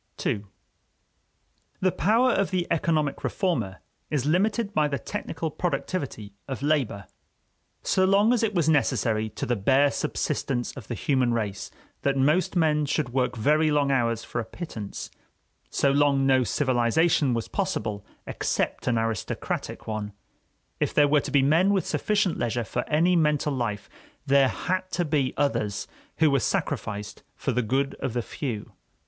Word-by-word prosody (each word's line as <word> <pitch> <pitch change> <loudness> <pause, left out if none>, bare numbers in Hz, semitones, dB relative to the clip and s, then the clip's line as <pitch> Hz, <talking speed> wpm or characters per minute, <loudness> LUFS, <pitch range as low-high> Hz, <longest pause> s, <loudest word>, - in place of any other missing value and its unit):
II 100 0 0 1.3
The 185 0 +2
power 230 +9 +3
of 195 -3 +1
the 185 -2 0
economic 155 -3 0
reformer 120 - -1 0.3
is 145 -4 -1
limited 205 +6 +1
by 150 -4 +3
the 140 -1 -2
technical 160 +6 -4
productivity 140 - -3
of 135 -1 -5
labor. 135 -10 0 0.8
So 190 - +2
long 200 +5 +4
as 245 - +1
it 215 -3 0
was 165 -3 +2
necessary 115 -7 +2
to - - -5
the 120 - 0
bare 135 +7 +3
subsistence 120 -3 -2
of 130 - -9
the 120 - -3
human 125 0 +1
race 105 -4 -3 0.3
that 140 -1 +1
most 150 +9 +2
men 150 -3 +2
should 145 -1 0
work 125 0 0
very 155 +7 +3
long 145 -2 +2
hours 115 -3 +1
for 120 - -3
a - - -4
pittance, 110 - -7 0.6
so 140 - +2
long 140 -1 +3
no 130 -1 +4
civilization 130 +2 +2
was 115 - -2
possible 115 - -2 0.2
except - - -2
an 120 -2 +2
aristocratic 115 -3 -3
one; 105 -2 -4 0.7
if - - -1
there 145 -1 +6
were 145 0 +3
to - - -6
be 140 -1 +3
men 165 +8 +4
with 195 - +1
sufficient 205 -4 0
leisure 120 0 -1
for 120 +4 -4
any 170 +4 +3
mental 150 -3 +2
life, 110 -6 -3 0.4
there 140 -1 +5
had 185 +1 -2
to 175 - 0
be 145 -4 0
others 105 -8 0 0.3
who 155 -2 +4
were 140 - +3
sacrificed 105 -3 -3
for 135 - -2
the 125 +1 +1
good 135 +5 0
of 130 - -3
the 120 -1 -1
few. 115 -7 -5
140 Hz, 160 wpm, -26 LUFS, 120-165 Hz, 1.3 s, there